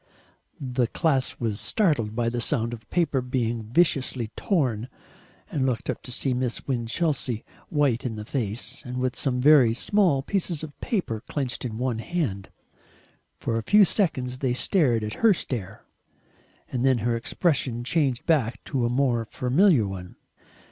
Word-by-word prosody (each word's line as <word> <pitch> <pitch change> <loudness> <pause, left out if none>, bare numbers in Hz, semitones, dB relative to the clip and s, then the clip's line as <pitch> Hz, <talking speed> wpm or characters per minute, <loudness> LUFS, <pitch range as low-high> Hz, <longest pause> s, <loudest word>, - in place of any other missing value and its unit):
The 125 -3 0
class 135 -2 0
was 110 -4 -2
startled 135 - +1
by 120 -1 0
the 120 +1 -1
sound 115 -2 0
of 110 -2 -10
paper 155 -7 +1
being 120 -2 -1
viciously 130 -1 +1
torn, 130 - 0 0.6
and 140 - 0
looked 125 -3 -1
up - - -8
to 125 - -9
see 130 +1 0
Miss 125 -1 -2
Winchelsea 125 -1 -1 0.2
white 140 -6 +1
in 120 -3 -3
the 105 0 -6
face, 120 +2 -2
and 125 0 -6
with 125 0 -1
some 125 -3 0
very 130 -4 +6
small 175 - +2
pieces 175 -3 -1
of 145 -3 -8
paper 180 - -2
clenched 130 -3 -3
in 110 -3 -4
one 125 -2 -1
hand. 115 - -3 0.9
For 115 0 -1
a - - -3
few 205 - +6
seconds 130 - 0
they 130 -3 0
stared 125 - +2
at 105 0 -3
her 220 -4 +6
stare, 110 - -5 0.9
and 125 -1 -1
then 130 -2 +4
her 120 -1 +2
expression 120 -1 0
changed 135 -2 0
back 135 -9 +1
to 130 -4 -1
a - - -1
more 120 -2 +1
familiar 135 - +3
one. 90 -2 -7
125 Hz, 160 wpm, -25 LUFS, 115-145 Hz, 0.9 s, very